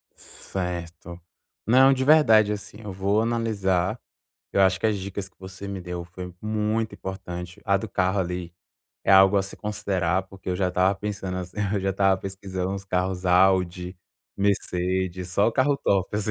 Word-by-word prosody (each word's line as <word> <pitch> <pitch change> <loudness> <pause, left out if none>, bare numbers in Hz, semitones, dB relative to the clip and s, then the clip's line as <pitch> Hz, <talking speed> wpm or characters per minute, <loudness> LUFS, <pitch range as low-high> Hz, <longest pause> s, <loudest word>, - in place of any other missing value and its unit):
Certo. 85 -2 -6 0.5
Não, 130 +4 +6
de 130 0 -1
verdade 115 -8 +6
assim, 105 0 -6
eu 105 - -6
vou 100 +3 +1
analisar, 110 -3 0 0.5
eu - - +2
acho 95 -1 +4
que 100 - 0
as 110 -2 +1
dicas 95 0 -5
que 95 - -39
você 95 +1 -9
me 100 -1 -5
deu 90 -1 -5
foi 90 +1 -9
muito 110 0 -1
importante, 95 -1 -7
a 100 - +3
do 105 +2 -4
carro 95 +1 +1
ali 90 -1 -4 0.5
é - - +2
algo 95 +1 +7
a 100 - +3
se 95 - -9
considerar 95 -4 -1
porque 95 -1 -10
eu - - 0
já 95 -1 +1
estava 90 +2 +2
pensando 95 -2 -4
assim, 90 +1 -7 0.2
eu 100 - 0
já 95 +1 0
estava 95 0 +3
pesquisando 95 -1 -4
uns 100 0 -5
carros 95 -1 -1
Audi, 90 0 +2 0.4
Mercedes, 95 -2 -1
só 100 +4 +3
o 115 - -3
carro 140 +1 +2
top 95 -4 0
assim 105 0 -1
95 Hz, 175 wpm, -25 LUFS, 90-105 Hz, 0.5 s, algo